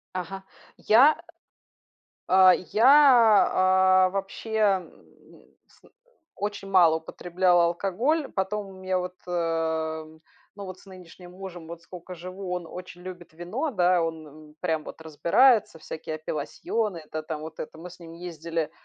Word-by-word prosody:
Ага. 190 +2 -5 0.3
Я, 260 +8 +5
э, - - -15 1.1
а, 185 0 +7
я, 200 +7 +1 1.2
а, - - -2
вообще, 195 +3 -6
м, 195 -4 +1 0.4
ну, - - -20 0.2
сн - - -24 0.5
очень 205 -1 -5
мало 170 -4 +5
употребляла 175 +2 +1
алкоголь. 230 - -1
Потом 200 +2 -2
у 195 - -12
меня 185 0 -2
вот, 180 0 -5
э, - - -8
м, 160 -2 -2 0.4
ну 200 - -8
вот 185 0 -9
с - - -19
нынешним 180 -1 -14
мужем 180 -3 -9
вот 170 0 -9
сколько 180 +1 -10
живу, 185 +2 -7
он 180 -2 -4
очень 180 +1 -10
любит 180 -3 -10
вино, 205 - -4
да, 180 -4 +2
он 160 -1 -4
н 150 +1 -16
прям 160 -4 -1
вот - - -10
разбирается, 200 - +3
всякие 155 0 -7
апелласьоны 165 +6 -3
это 155 0 -7
там 155 -1 -6
вот 160 +1 -9
это. 160 - -8
Мы 175 +2 -9
с 180 - -15
ним 165 -1 -12
ездили 165 -2 -5
180 Hz, 155 wpm, -26 LUFS, 160-190 Hz, 1.2 s, а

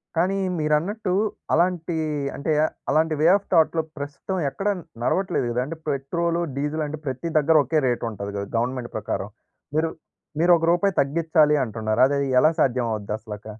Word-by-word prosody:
కానీ 185 +4 +1 0.2
మీరన్నట్టు 180 +6 0 0.4
అలాంటి 170 0 +1 0.4
అంటే 150 +3 -2
ఆహ్, - - -3 0.2
అలాంటి 155 +2 +2
వే 160 - +5
ఆఫ్ 200 - -3
థాట్‌లో 160 0 +4 0.2
ప్రస్తుతం 145 +7 -5
ఎక్కడ 195 +10 -4 0.4
నడవట్లేదు 185 -6 0
గదా! 125 +1 0
అంటే 160 +3 -6
పెట్రోలు, 170 +5 -1 0.2
డీజిలు 150 +2 -1
అంటే 155 +1 -6
ప్రతి 130 +5 -3
దగ్గర 160 +2 +3
ఒకే 150 +4 +1
రేట్ 120 -1 -1
ఉంటది 100 -1 -6
గదా! 100 0 -4
గవర్నమెంట్ 125 0 -2
ప్రకారం. 100 -1 -3 0.5
మీరు 160 +1 +1 0.5
మీరు 175 +1 +4
ఒక 165 - -1
రూపాయి 195 +2 +2
తగ్గిచ్చాలి 155 +1 +3
అంటున్నారు. 110 0 -1
అది 140 0 0 0.2
ఎలా 155 - +5
సాధ్యం 125 -3 +1
అవుద్ది 105 0 -4
అసలక? 105 -1 -9
150 Hz, 160 wpm, -24 LUFS, 125-170 Hz, 0.5 s, వే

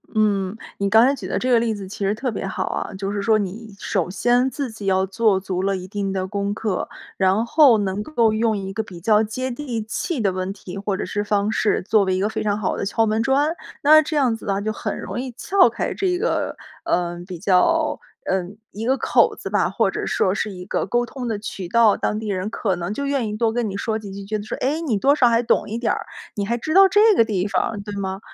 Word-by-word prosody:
嗯， 205 -2 +1 0.2
你 200 0 +1
刚 220 +3 +6
才 270 - +3
举 280 - -6
的 - - -1
这 255 - 0
个 235 - +6
例 225 -1 0
子 195 -2 -7
其 195 - -10
实 200 +2 +1
特 250 +3 -2
别 205 - -4
好 190 -1 -2
啊。 - - -4
就 195 +1 -3
是 205 - -2
说 220 +1 +3
你 210 +2 -5
首 180 -3 -1
先 245 +6 +2
自 265 -1 -4
己 210 -3 -7
要 190 0 +3
做 200 0 +2
足 185 -1 -3
了 195 0 0
一 185 0 -8
定 200 0 -3
的 190 -1 -2
功 200 +1 -2
课， 205 -3 -2 0.3
然 195 +4 +2
后 270 -2 +6
能 200 -1 -1
够 230 -3 +1
用 220 -1 +1
一 195 -1 -5
个 220 - -1
比 185 -5 -10
较 210 +3 +3
接 255 +4 -3
地 240 -4 -4
气 260 - -3
的 200 -4 +1
问 185 +1 -3
题， 195 -1 -9
或 200 -1 -2
者 - - -3
是 205 0 -2
方 205 0 0
式 215 - +1
作 215 -3 +4
为 185 -1 +1
一 - - -1
个 200 - +1
非 220 - -3
常 205 -1 0
好 195 - -1
的 - - -3
敲 225 +2 +2
门 220 +1 +1
砖。 280 +7 +2 0.3
那 310 +2 +8
这 310 0 -3
样 255 -5 +2
子 220 - -8
啊， 195 0 +1
就 215 +1 -2
很 - - -4
容 - - -5
易 260 -1 -5
撬 390 -1 +4
开， - - -3
这 365 -2 0
个， - - -1 0.3
嗯， 175 0 -1
比 180 -2 -7
较， 210 - +2 0.3
嗯 190 +2 -2
一 220 +4 -5
个 265 +1 +2
口 - - +3
子 - - -8
吧， - - +2
或 - - +1
者 - - -4
说 185 - +1
是 210 +1 -2
一 180 -1 -8
个 - - -2
沟 240 0 +1
通 250 0 -6
的 220 -3 -1
渠 195 -3 -6
道。 230 0 +5
当 210 - -1
地 220 -1 -5
人 190 +1 -2
可 200 -4 -1
能 175 +2 -4
就 280 +6 -3
愿 275 -5 0
意 210 - -4
多 225 -1 +1
跟 235 -2 -1
你 195 - -4
说 220 +1 -2
几 200 -2 -9
句， 195 0 -8
觉 215 +1 -2
得 - - -6
说： 210 - -5
“诶， 295 +5 -1
你 255 -11 0
多 280 +7 +3
少 245 -5 +4
还 230 +1 +2
懂 230 - +1
一 220 - -3
点 235 -1 0
儿， - - -4 0.3
你 200 -1 -3
还 235 - 0
知 310 +7 -3
道 390 0 +8
这 425 +3 +5
个 230 - +6
地 205 -3 -1
方。” 205 +1 -1
对 205 - -6
吗？ 190 -1 -3
215 Hz, 280 characters per minute, -22 LUFS, 195-240 Hz, 0.3 s, 那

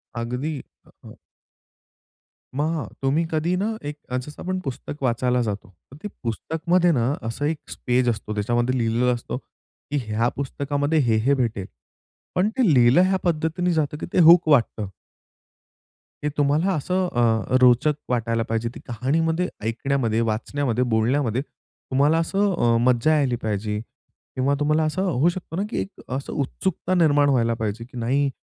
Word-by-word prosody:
अगदी. 125 +6 -3 0.3
अ, - - -20 0.2
हं - - -12 1.4
मग 155 +1 -1
तुम्ही 140 +5 +1
कधी 165 +3 0
ना 220 +3 -1
एक 150 0 -5
जसं 130 +4 -4
आपण 185 +1 -2
पुस्तक 135 +2 -5
वाचायला 125 0 +1
जातो 105 -4 -4 0.2
तर 140 - -12
ते - - -2 0.2
पुस्तकमध्ये 170 - +1
ना 125 -1 +1
असं 115 +6 -3
एक 155 +1 0 0.3
पेज 125 0 +3
असतो. 110 -2 -3
त्याच्यामध्ये 120 +4 0
लिहिलेलं 120 +1 +1
असतं 120 +1 -5 0.5
की 145 - +1
ह्या 110 +3 +1
पुस्तकामध्ये 145 +3 -1
हे, 120 -5 +2
हे 130 +6 +2
भेटेल. 115 -7 -1 0.7
पण 190 +4 +2
ते 220 - +4
लिहिलं 125 +6 +6
ह्या 190 +1 +3
पद्धतीने 170 +1 0
जातं 150 -1 0
की - - -5
ते - - +3
हूक 170 0 +7
वाटतं. 115 -6 +2 1.4
हे 150 - +1
तुम्हाला 150 +7 +2
असं 180 +4 0
अ, 120 -3 +1
रोचक 125 +4 +5 0.2
वाटायला 115 -2 0
पाहिजे 115 +1 -1
ती - - -8
कहाणीमध्ये, 160 +9 0 0.2
ऐकण्यामध्ये, 115 0 0
वाचण्यामध्ये, 125 +2 -1
बोलण्यामध्ये 120 +2 +1
तुम्हाला 145 +2 -1
असं 195 +4 +1
अ, 120 -6 +3
मज्जा 125 +5 +3
यायला 135 -5 +1
पाहिजे 105 0 -2 0.6
किंवा 135 +2 +1
तुम्हाला 150 +2 +2
असं 155 +4 -1
होऊ 170 -3 +2
शकतो 175 -2 -6
ना 190 - -1
की - - -2
एक 200 - -9
असं 135 +1 -4
उत्सुकता 175 +6 -2
निर्माण 145 -5 +4
व्हायला 115 -3 +2
पाहिजे. 110 0 -3
की 125 0 -12
नाही, 135 +4 +1
140 Hz, 155 wpm, -23 LUFS, 120-160 Hz, 1.4 s, हूक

